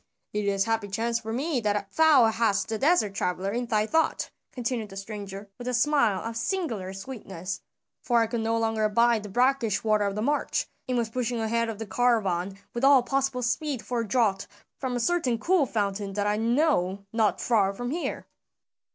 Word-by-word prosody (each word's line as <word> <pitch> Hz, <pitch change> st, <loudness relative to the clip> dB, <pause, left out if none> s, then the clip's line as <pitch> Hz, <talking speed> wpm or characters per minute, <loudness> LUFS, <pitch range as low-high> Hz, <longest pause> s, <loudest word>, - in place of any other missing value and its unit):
"It 210 Hz, 0 st, -1 dB
is 195 Hz, -1 st, +2 dB
a -, -, -5 dB
happy 225 Hz, -2 st, 0 dB
chance 230 Hz, +4 st, -1 dB
for 220 Hz, -, -6 dB
me 275 Hz, +4 st, -1 dB
that 210 Hz, -2 st, -1 dB
thou 310 Hz, -6 st, +6 dB
hadst 225 Hz, -2 st, +1 dB
the 220 Hz, -1 st, -2 dB
desert 275 Hz, -, +3 dB
traveler 190 Hz, 0 st, -1 dB
in 240 Hz, +2 st, -2 dB
thy 215 Hz, -2 st, +2 dB
thought," 320 Hz, +8 st, 0 dB, 0.2 s
continued 235 Hz, -3 st, -3 dB
the 195 Hz, -, -10 dB
stranger 200 Hz, 0 st, -7 dB
with 245 Hz, -, -7 dB
a 250 Hz, -, 0 dB
smile 240 Hz, -7 st, +2 dB
of 230 Hz, 0 st, -5 dB
singular 230 Hz, -, -2 dB
sweetness, 195 Hz, -3 st, -6 dB, 0.4 s
"for 240 Hz, -2 st, +2 dB
I 225 Hz, -, +3 dB
could 230 Hz, +1 st, -3 dB
no 225 Hz, +1 st, 0 dB
longer 225 Hz, -1 st, 0 dB
abide 230 Hz, +1 st, +3 dB
the 210 Hz, -, -8 dB
brackish 245 Hz, -1 st, +1 dB
water 215 Hz, -2 st, +2 dB
of 200 Hz, -1 st, -2 dB
the 210 Hz, -, -2 dB
march, 290 Hz, +4 st, 0 dB, 0.2 s
and 250 Hz, -, +1 dB
was 230 Hz, -2 st, -1 dB
pushing 245 Hz, -1 st, -1 dB
ahead 230 Hz, +1 st, 0 dB
of 220 Hz, -, -5 dB
the 225 Hz, -, -5 dB
caravan 200 Hz, -6 st, +1 dB, 0.2 s
with 235 Hz, -, -4 dB
all 275 Hz, -2 st, +7 dB
possible 270 Hz, -1 st, 0 dB
speed 275 Hz, +1 st, -1 dB
for 245 Hz, -1 st, -2 dB
a 230 Hz, -, -2 dB
draught 205 Hz, -4 st, +1 dB, 0.3 s
from 255 Hz, -2 st, -2 dB
a -, -, 0 dB
certain 265 Hz, -3 st, +1 dB
cool 335 Hz, +3 st, +2 dB
fountain 200 Hz, -2 st, -2 dB
that 205 Hz, 0 st, -1 dB
I 210 Hz, 0 st, +2 dB
know 225 Hz, -, +1 dB
not 220 Hz, -2 st, +2 dB
far 205 Hz, -5 st, +2 dB
from 245 Hz, +5 st, -5 dB
here." 335 Hz, +3 st, -3 dB
225 Hz, 200 wpm, -27 LUFS, 205-250 Hz, 0.4 s, all